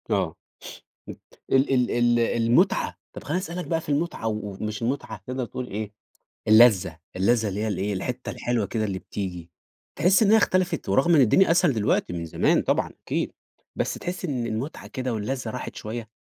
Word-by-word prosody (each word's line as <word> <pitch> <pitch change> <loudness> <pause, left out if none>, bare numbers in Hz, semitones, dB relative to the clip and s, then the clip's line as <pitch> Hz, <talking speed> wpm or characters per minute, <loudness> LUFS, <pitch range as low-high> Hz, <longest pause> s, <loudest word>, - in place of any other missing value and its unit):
آه، - - 0 0.7
مت - - -9 0.3
ال 135 +1 +4
ال 125 -1 +2
ال 120 0 +3
المُتعة، 115 +1 +2
طب - - -9
خلّيني 165 +6 -1
اسألك 180 -1 -5
بقى 165 -2 0
في - - -14
المُتعة، 145 -4 -1
و - - 0 0.3
ومش 105 +1 -4
المُتعة 115 -4 -3
تقدر 130 0 -3
تقول 125 +2 -6
إيه 105 +1 -5 0.6
اللّذة 105 -7 +6 0.2
اللّذة 110 +4 +2
اللي 100 +1 -3
هي 110 - -1
الإيه 105 0 -1
الحتة 125 +6 -4
الحلوة 120 -4 -1
كده 110 +2 -2
اللي 95 -3 -2
بتيجي، 90 -4 -6 0.5
تحس 185 +7 +4
إن 205 - +4
هي 220 - +7
اختلفت 185 -4 +1
ورغم 135 - +4
إن 150 - +6
الدنيا 140 - +5
أسهل 175 -2 +4
دلوقتي 105 -6 0
من 85 -1 -4
زمان 80 - +2
طبعًا - - 0 0.2
أكيد، - - -1 0.4
بس - - -1
تحس 180 +1 -5
إن 130 -8 -2
المُتعة 115 +7 -4
كده 130 -3 -3
واللّذة 115 +2 -3
راحت 125 - -6
شوية؟ 110 +1 -6
120 Hz, 180 wpm, -25 LUFS, 105-140 Hz, 0.7 s, هي